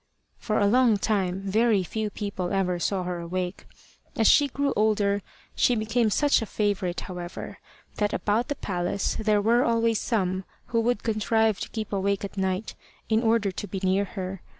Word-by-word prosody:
For 215 Hz, -, -1 dB
a 205 Hz, -, +3 dB
long 235 Hz, 0 st, +4 dB
time 195 Hz, -3 st, 0 dB
very 210 Hz, +1 st, +2 dB
few 215 Hz, +4 st, -3 dB
people 200 Hz, -4 st, -4 dB
ever 185 Hz, -3 st, 0 dB
saw 190 Hz, +1 st, 0 dB
her 180 Hz, -1 st, -3 dB
awake. 180 Hz, +2 st, -4 dB, 0.5 s
As 225 Hz, -, +1 dB
she 290 Hz, -, +6 dB
grew 280 Hz, +1 st, -1 dB
older 205 Hz, -1 st, +2 dB, 0.3 s
she 245 Hz, -, +3 dB
became 225 Hz, +1 st, +1 dB
such 290 Hz, +5 st, +3 dB
a 225 Hz, -, -4 dB
favourite, 200 Hz, -5 st, -1 dB
however, 175 Hz, -2 st, -7 dB, 0.4 s
that 210 Hz, -1 st, +1 dB
about 220 Hz, +3 st, 0 dB
the 290 Hz, -, -2 dB
palace 180 Hz, -1 st, -2 dB
there 210 Hz, -2 st, +2 dB
were 235 Hz, +3 st, +4 dB
always 230 Hz, -1 st, +2 dB
some 190 Hz, -5 st, 0 dB, 0.3 s
who 230 Hz, -1 st, +2 dB
would 235 Hz, -2 st, 0 dB
contrive 220 Hz, -1 st, +1 dB
to -, -, -5 dB
keep 215 Hz, -2 st, -5 dB
awake 200 Hz, 0 st, 0 dB
at 200 Hz, -, -9 dB
night, 190 Hz, +1 st, -2 dB, 0.4 s
in 220 Hz, 0 st, +3 dB
order 225 Hz, -3 st, +2 dB
to 205 Hz, -, -6 dB
be 195 Hz, -, -4 dB
near 190 Hz, +2 st, +2 dB
her. 185 Hz, -1 st, -6 dB
205 Hz, 175 wpm, -26 LUFS, 190-225 Hz, 0.5 s, she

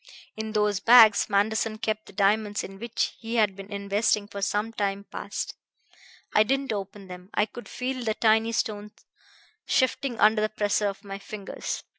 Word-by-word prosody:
In 220 Hz, 0 st, -5 dB
those 210 Hz, -2 st, +1 dB
bags 225 Hz, -3 st, +7 dB
Manderson 215 Hz, +2 st, +1 dB
kept 215 Hz, -1 st, -3 dB
the -, -, -12 dB
diamonds 205 Hz, +1 st, +1 dB
in 195 Hz, 0 st, -9 dB
which 235 Hz, +1 st, -2 dB
he 230 Hz, +1 st, -5 dB
had 210 Hz, -4 st, +2 dB
been 195 Hz, +1 st, -10 dB
investing 205 Hz, +1 st, 0 dB
for 200 Hz, -1 st, -7 dB
some 210 Hz, +3 st, -1 dB
time 200 Hz, -2 st, -2 dB
past. -, -, -5 dB, 0.8 s
I -, -, +5 dB
didn't 270 Hz, +2 st, +1 dB
open 200 Hz, -1 st, -6 dB
them; 180 Hz, 0 st, -10 dB
I 210 Hz, -, +3 dB
could 240 Hz, +2 st, -11 dB
feel 255 Hz, 0 st, -3 dB
the 220 Hz, -2 st, -1 dB
tiny 220 Hz, 0 st, +3 dB
stones 210 Hz, -2 st, -4 dB, 0.6 s
shifting 260 Hz, -2 st, +1 dB
under 215 Hz, +1 st, +5 dB
the 215 Hz, -, +1 dB
pressure 210 Hz, -1 st, 0 dB
of 200 Hz, +1 st, -5 dB
my 195 Hz, -1 st, -7 dB
fingers. 200 Hz, 0 st, -6 dB
210 Hz, 170 wpm, -26 LUFS, 200-225 Hz, 0.8 s, bags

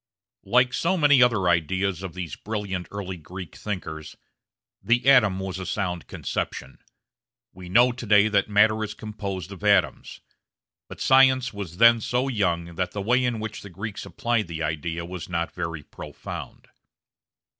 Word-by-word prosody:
Like 125 Hz, +1 st, +3 dB
so 170 Hz, +9 st, +1 dB
many 145 Hz, -5 st, +5 dB
other 115 Hz, -7 st, +3 dB
ideas 90 Hz, +2 st, +1 dB
of 95 Hz, -3 st, -7 dB
these 90 Hz, -3 st, -5 dB
brilliant 100 Hz, -4 st, -4 dB
early 95 Hz, -2 st, -6 dB
Greek 90 Hz, +1 st, -9 dB
thinkers, 80 Hz, -7 st, -6 dB, 0.6 s
the 120 Hz, +3 st, +1 dB
atom 110 Hz, -9 st, +5 dB
was 95 Hz, -1 st, -4 dB
a 95 Hz, -, -5 dB
sound 90 Hz, -4 st, -3 dB
conception. 65 Hz, -, -5 dB, 0.7 s
We 90 Hz, 0 st, -11 dB
know 120 Hz, +7 st, +5 dB
to 120 Hz, -1 st, -8 dB
day 105 Hz, 0 st, +6 dB
that 100 Hz, -1 st, +1 dB
matter 110 Hz, +1 st, +3 dB
is 105 Hz, -, -5 dB
composed 100 Hz, -4 st, -6 dB
of 100 Hz, +1 st, -10 dB
atoms. 100 Hz, -3 st, +1 dB, 0.7 s
But -, -, -10 dB
science 130 Hz, -2 st, +4 dB
was 95 Hz, -4 st, -7 dB
then 115 Hz, 0 st, +6 dB
so 125 Hz, +4 st, 0 dB
young 85 Hz, -7 st, -1 dB
that 90 Hz, -, -2 dB
the 105 Hz, -, -4 dB
way 125 Hz, +4 st, +2 dB
in 120 Hz, -3 st, -1 dB
which 110 Hz, 0 st, -6 dB
the 100 Hz, -, -10 dB
Greeks 100 Hz, +4 st, -6 dB
applied 115 Hz, -4 st, -1 dB
the 80 Hz, -1 st, -5 dB
idea 80 Hz, +2 st, -3 dB
was 90 Hz, -1 st, -7 dB
not 85 Hz, -1 st, -2 dB
very 85 Hz, -4 st, -5 dB
profound. 75 Hz, +1 st, -9 dB
100 Hz, 160 wpm, -25 LUFS, 90-115 Hz, 0.7 s, day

